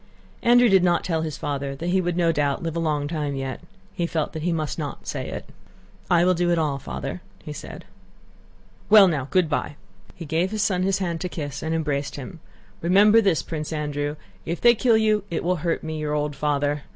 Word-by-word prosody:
Andrew 245 +1 +6
did 190 -4 +5
not 175 -1 +2
tell 165 -3 -1
his 155 -2 -4
father 140 -2 -3
that 170 +5 -4
he 190 +1 +2
would 175 -1 -2
no 170 -2 +3
doubt 145 -2 0
live 165 -1 -3
a - - 0
long 150 -3 0
time 150 -3 -2
yet. 135 -1 -4 0.3
He 170 - -1
felt 160 -2 -2
that 160 - -5
he 175 +2 0
must 155 -1 -2
not 145 -2 -5
say - - -4
it. - - -6 0.6
"I 175 0 +4
will 185 - +4
do 175 0 0
it 170 - +2
all, 150 -4 0
Father," - - -6 0.2
he - - -6
said. - - -9 1.0
"Well, 210 -2 +9
now, 145 -6 -1
good 185 -3 +3
by!" 145 -1 -2 0.4
He 170 - -8
gave 165 +5 0
his 215 0 -1
son 185 -3 +1
his 190 +1 +1
hand 170 -4 -3
to 180 - -2
kiss, 145 -5 -5
and 160 +1 -1
embraced 145 -3 -2
him. 145 +5 -8 0.4
"Remember 205 +6 +5
this, 195 -6 +2
Prince 155 -1 -5
Andrew, 145 -1 -2 0.3
if 170 0 -3
they 240 0 +6
kill 230 0 +3
you 215 -2 +2
it 165 - -2
will 180 +1 +1
hurt 165 +1 -2
me, 155 0 -4
your 150 -1 -2
old 150 -1 -1
father..." 145 0 0
165 Hz, 220 wpm, -24 LUFS, 150-180 Hz, 1.0 s, Well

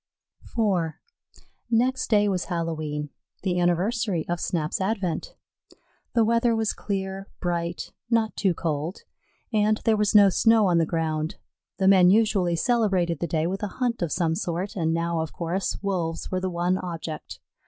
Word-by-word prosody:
IV 185 -8 +1 0.8
Next 255 +3 +1
day 210 -2 +4
was 185 -3 0
Hallowe'en, 155 -4 -3 0.3
the 180 -2 0
anniversary 180 +1 +1
of 175 0 -2
Snap's 165 +1 -1
advent. 190 -5 -2 0.8
The 230 -2 +4
weather 230 +1 +2
was 220 -1 0
clear, 195 -1 -4
bright, 170 -1 -3 0.2
not 230 -2 +1
too 190 -4 +1
cold, 160 +3 -3 0.5
and 215 0 +2
there 225 -2 +4
was 210 0 +1
no 200 -1 +8
snow 225 +2 +4
on 175 -3 +3
the 165 - +1
ground. 160 -1 -1 0.4
The 190 - +2
men 185 -2 +7
usually 200 -4 +3
celebrated 185 - +1
the 170 - -1
day 160 0 0
with 190 +3 -2
a 210 - -1
hunt 245 -4 -1
of 170 -3 -1
some 170 -3 +1
sort, 175 +3 -3
and 160 -4 0
now, 170 0 0
of 160 -1 -3
course, 175 +3 -2
Wolves 175 -5 -2
were 185 0 -1
the 185 - -1
one 175 +1 0
object. 165 -3 -6
185 Hz, 160 wpm, -25 LUFS, 170-210 Hz, 0.8 s, no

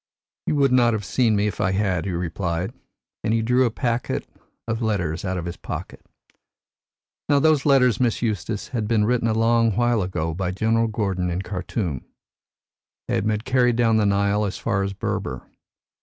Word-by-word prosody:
'You - - +1
would 140 -2 +3
not 120 -2 +4
have 105 -2 -3
seen 110 +3 +2
me 100 0 +1
if 105 - -2
I 95 -2 +1
had,' 95 -4 0
he 100 - -2
replied, 85 +1 -2 0.5
and 110 - +1
he 115 - +1
drew 125 +3 +3
a - - +2
packet 120 +1 -2 0.4
of 110 +1 -2
letters 90 -8 -1
out 95 -1 -2
of 85 - -4
his 85 - -5
pocket. - - -7 1.3
Now, 145 - +5
those 150 0 +3
letters, 125 -5 +4
Miss 120 -3 +1
Eustace, 110 -2 -2
had 115 -5 -2
been 110 -2 +2
written 120 0 +1
a 110 - +1
long 115 -1 +3
while 120 -2 +2
ago 80 -3 -2
by 90 +2 -2
General 110 +4 +1
Gordon 95 -5 -1
in 90 +2 -2
Khartum. 90 - -3 1.0
They - - -2
had 105 - 0
been 105 -1 0
carried 125 -1 +2
down 115 -2 +3
the 105 -2 +3
Nile 100 +1 +2
as 95 -2 -2
far 100 0 -1
as 100 0 -2
Berber. 65 -8 -3
105 Hz, 185 wpm, -23 LUFS, 95-120 Hz, 1.3 s, Now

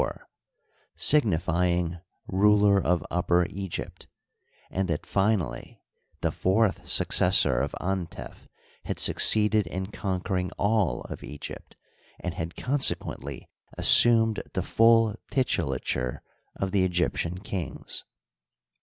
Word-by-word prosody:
r— - - -5 0.7
signifying 90 - +1 0.3
ruler 100 0 +3
of 85 -2 0
Upper 90 0 +1
Egypt; 95 -2 -7 0.6
and 95 0 -1
that, 80 -2 -3
finally, 95 - -2 0.4
the - - 0
fourth 100 +2 0
successor 65 -3 +3
of - - -3
Antef 95 -2 -5 0.4
had - - -4
succeeded 105 -2 +4
in 95 +4 -5
conquer 95 -1 -3
ing 90 0 -2
all 100 - +1
of - - -9
Egypt, 75 - -9 0.4
and 90 - -4
had 85 -1 -6
consequently 125 - 0 0.3
assumed 115 -2 +5
the - - -2
full 115 -1 +4 0.2
titulature 65 - -1 0.3
of 95 -1 -3
the 95 -1 +2
Egyptian 90 -1 -1
kings. 90 -4 -5
95 Hz, 105 wpm, -26 LUFS, 85-105 Hz, 0.7 s, assumed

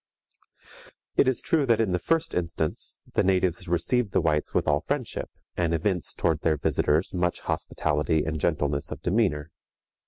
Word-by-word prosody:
It - - +4
is 130 - +1
true 150 -4 +2
that 115 -2 +4
in 110 -4 +2
the 90 - +1
first 165 - 0
instance 85 -3 -2
the - - +3
natives 90 -1 +1
received 95 +7 +1
the - - +4
whites 75 -2 +1
with - - 0
all 75 0 +3
friendship, 135 - -3 0.3
and 85 -2 +1
evinced 90 +1 -1
toward 80 -3 +1
their 80 -2 +2
visitors 75 +3 +1
much 90 -1 0
hospitality 75 0 0
and 80 -1 -2
gentleness 75 -3 0
of - - -7
demeanor. 90 -7 +1
85 Hz, 160 wpm, -26 LUFS, 80-100 Hz, 0.3 s, It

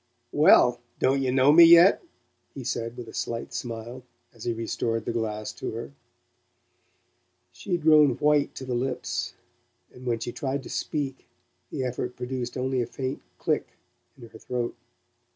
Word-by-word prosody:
"Well 125 -5 +5 0.2
don't 135 +1 +2
you 130 -1 0
know 130 +2 +5
me 170 +3 +9
yet?" 170 +3 +8 0.5
he 135 - -6
said 115 0 -3
with 120 - -7
a 110 - -11
slight 115 0 -4
smile, 120 +1 -6 0.3
as 115 - -11
he 120 - 0
restored 115 0 -2
the - - -1
glass 110 -2 -3
to 105 - -6
her. 115 +4 -6 1.6
She 190 - -6
had 170 -3 0
grown 150 -5 +6
white 150 -1 +2
to 130 - -7
the 130 - -3
lips, 125 +2 -3 0.6
and 125 0 -11
when 120 -1 +1
she 120 - -5
tried 135 +2 -3
to - - -9
speak 140 -3 -3 0.4
the 130 - -3
effort 125 0 -3
produced 125 -1 -4
only 130 0 0
a 120 - -2
faint 130 +2 -4 0.2
click - - -1 0.5
in 120 -3 -12
her 110 - -14
throat. 120 -1 -3
125 Hz, 165 wpm, -26 LUFS, 115-135 Hz, 1.6 s, me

